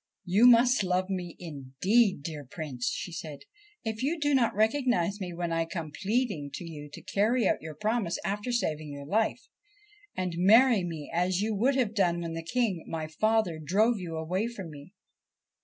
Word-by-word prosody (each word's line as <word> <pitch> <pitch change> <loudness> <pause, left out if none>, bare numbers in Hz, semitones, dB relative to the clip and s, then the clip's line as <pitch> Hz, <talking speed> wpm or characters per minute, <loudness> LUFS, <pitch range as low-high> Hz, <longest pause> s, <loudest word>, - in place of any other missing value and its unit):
1 180 - -6
You 225 +5 +7
must 245 -1 +6
love 185 +1 0
me 180 -3 -4
indeed, 170 - +1
dear 150 -2 -5
Prince,' 135 -3 -5
she 180 - -4
said, 160 -5 -7 0.2
' 415 0 -31
if 220 0 -3
you 310 +5 0
do 290 -1 +1
not 245 -6 +2
recognise 220 -4 +1
me 180 -2 -4
when 170 0 -3
I 165 0 +1
come 165 -3 -5
pleading 200 - -1
to - - -6
you 150 -2 -8
to 165 - -10
carry 210 +5 +2
out - - +1
your 155 -1 -8
promise 215 0 -1
after 205 +5 -2
saving 155 -10 -1
your 140 0 -8
life, 215 +8 0 0.7
and 185 -2 -1
marry 220 +3 +6
me 160 -4 -6
as 180 +2 +1
you 220 +1 0
would 250 +7 +2
have 240 -5 +1
done 175 -5 +2
when 165 -1 -4
the 165 - -4
King, 195 -1 -1
my 160 -1 -3
father, 200 +1 +1
drove 205 +9 +2
you 170 -3 -5
away 180 +7 -1
from 195 -8 -7
me.' 145 +3 -12
185 Hz, 190 wpm, -29 LUFS, 165-225 Hz, 0.7 s, You